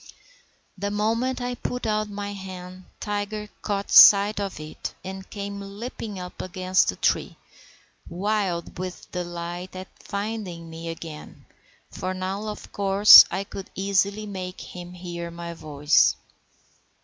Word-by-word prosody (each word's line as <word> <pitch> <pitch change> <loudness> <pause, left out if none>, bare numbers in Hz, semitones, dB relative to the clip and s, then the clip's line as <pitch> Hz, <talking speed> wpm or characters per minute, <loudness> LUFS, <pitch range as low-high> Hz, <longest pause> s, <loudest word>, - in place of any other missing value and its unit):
The 200 +1 -1
moment 230 +5 0
I 245 0 -2
put 250 0 -4
out 215 -1 0
my 205 0 -5
hand 185 -1 -9
Tiger 210 0 -3
caught 200 -1 -3
sight 205 +1 +8
of 195 -5 -4
it, 155 0 -7
and 190 0 -7
came 200 -1 -5
leaping 205 +1 -7
up 180 -1 -7
against 185 0 +1
the - - -1
tree, - - 0 0.7
wild 185 -2 -2
with 185 -1 -7
delight 175 +1 -5
at 185 +1 -7
finding 200 -5 -5
me 165 +1 -7
again, 165 -2 -9 0.5
for 185 0 -4
now 190 +3 -3
of 210 - -7
course 200 +1 +9
I 190 +2 -2
could 195 -1 -9
easily 200 +2 +1
make 185 -3 -6
him 180 0 -9
hear 175 -1 -6
iny 170 0 -7
voice. 150 -2 +3
190 Hz, 135 wpm, -25 LUFS, 180-205 Hz, 0.7 s, course